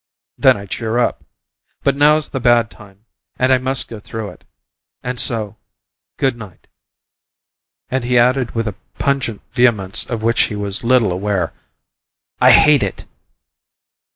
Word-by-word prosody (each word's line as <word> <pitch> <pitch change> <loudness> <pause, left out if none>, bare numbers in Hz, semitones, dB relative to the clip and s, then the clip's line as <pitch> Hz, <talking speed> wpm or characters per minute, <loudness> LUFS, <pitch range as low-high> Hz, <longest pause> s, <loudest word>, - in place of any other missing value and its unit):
Then - - +4
I 100 - -8
cheer 110 +3 -3
up. 120 - 0 0.6
But 140 -1 +2
now's 150 +2 +3
the 135 - -4
bad 120 -3 +3
time 100 0 -17 0.3
and 130 +1 +3
I 130 - +3
must 130 0 -1
go 115 - -9
through 110 0 -6
it, - - -16 0.6
and 125 -1 -3
so 110 -3 -1 0.6
good 135 -2 +1
night." 105 -7 -12 1.2
And 130 -1 -2
he 125 +1 +1
added 125 0 +2
with 115 -1 -1
a 105 - -3 0.2
pungent 135 -6 -1
vehemence 115 -6 +2
of 115 -2 -4
which 115 +1 +2
he 105 - -5
was 100 +1 -3
little 115 -4 +3
aware, 95 -2 -2 0.9
"I - - +7
hate 150 -1 +6
it!" - - -4
115 Hz, 150 wpm, -18 LUFS, 105-130 Hz, 1.2 s, I